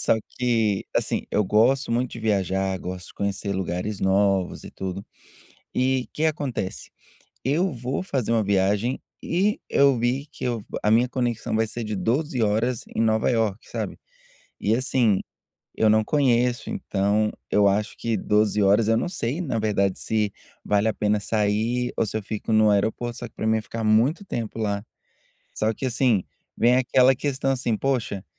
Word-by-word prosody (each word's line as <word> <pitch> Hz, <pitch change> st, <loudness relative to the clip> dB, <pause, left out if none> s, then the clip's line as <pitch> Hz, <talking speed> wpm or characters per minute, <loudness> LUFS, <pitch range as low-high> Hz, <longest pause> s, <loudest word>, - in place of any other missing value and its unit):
só -, -, +3 dB, 0.2 s
que 115 Hz, -5 st, +1 dB
assim, -, -, -1 dB
eu 105 Hz, -, +2 dB
gosto 115 Hz, +7 st, +3 dB
muito 120 Hz, +1 st, 0 dB
de 115 Hz, -, -7 dB
viajar, 95 Hz, -3 st, 0 dB
gosto 90 Hz, 0 st, -7 dB
de -, -, -15 dB
conhecer 100 Hz, 0 st, -2 dB
lugares 95 Hz, +2 st, -3 dB
novos 95 Hz, -1 st, +1 dB
e -, -, -9 dB
tudo. 95 Hz, +1 st, -5 dB, 0.7 s
E 130 Hz, 0 st, +1 dB
que 155 Hz, -, 0 dB
acontece? 140 Hz, -11 st, -3 dB, 0.5 s
Eu 160 Hz, +8 st, +1 dB
vou 125 Hz, +2 st, -3 dB
fazer 135 Hz, -, -2 dB
uma 115 Hz, -2 st, +3 dB
viagem 100 Hz, +5 st, +1 dB, 0.2 s
e 195 Hz, +5 st, 0 dB
eu 140 Hz, -2 st, +4 dB
vi 125 Hz, +4 st, 0 dB
que -, -, -6 dB
eu 120 Hz, -4 st, -2 dB, 0.2 s
a 105 Hz, -, +1 dB
minha 120 Hz, +3 st, +4 dB
conexão 120 Hz, -4 st, -2 dB
vai 110 Hz, 0 st, +2 dB
ser 120 Hz, +1 st, -5 dB
de 105 Hz, -1 st, -3 dB
12h 125 Hz, -, 0 dB
horas 110 Hz, +3 st, +1 dB
em 110 Hz, -, +1 dB
Nova 110 Hz, 0 st, +2 dB
Iorque, 115 Hz, -4 st, 0 dB
sabe, -, -, -4 dB, 0.6 s
e 105 Hz, +2 st, +2 dB
assim, 120 Hz, -6 st, +2 dB, 0.6 s
eu 110 Hz, -, +3 dB
não 110 Hz, 0 st, +4 dB
conheço, 125 Hz, -2 st, +1 dB
então 105 Hz, -, 0 dB, 0.2 s
eu 105 Hz, -1 st, +4 dB
acho 105 Hz, +2 st, 0 dB
que 115 Hz, -2 st, -1 dB
12h, 105 Hz, +1 st, +2 dB
horas 100 Hz, +3 st, +4 dB
eu 115 Hz, -, +4 dB
não 120 Hz, -, -1 dB
sei 150 Hz, -4 st, -3 dB
na 130 Hz, -9 st, -2 dB
verdade 100 Hz, -3 st, +1 dB
se 105 Hz, -2 st, 0 dB, 0.3 s
vale 105 Hz, +1 st, +2 dB
a -, -, -1 dB
pena 105 Hz, 0 st, +1 dB
sair 110 Hz, +4 st, 0 dB
ou -, -, +2 dB
se 110 Hz, -, -3 dB
eu -, -, -3 dB
fico 110 Hz, +2 st, -4 dB
no 110 Hz, -1 st, +5 dB
aeroporto. 110 Hz, +4 st, 0 dB
Só 120 Hz, -, -5 dB
que -, -, -37 dB
para 110 Hz, -, -2 dB
mim 110 Hz, -, +3 dB
ia 110 Hz, -, 0 dB
ficar 115 Hz, +1 st, -6 dB
muito 120 Hz, -, +3 dB
tempo 115 Hz, -, -4 dB
lá, 100 Hz, -2 st, -1 dB, 0.7 s
só 110 Hz, +1 st, +1 dB
que 130 Hz, -, -5 dB
assim, 120 Hz, -5 st, +2 dB, 0.3 s
vem 120 Hz, +2 st, +4 dB
aquela 130 Hz, +1 st, +4 dB
questão 135 Hz, 0 st, -1 dB
assim: 120 Hz, -4 st, 0 dB
"Poxa, 120 Hz, -8 st, -1 dB
110 Hz, 180 wpm, -24 LUFS, 105-125 Hz, 0.7 s, no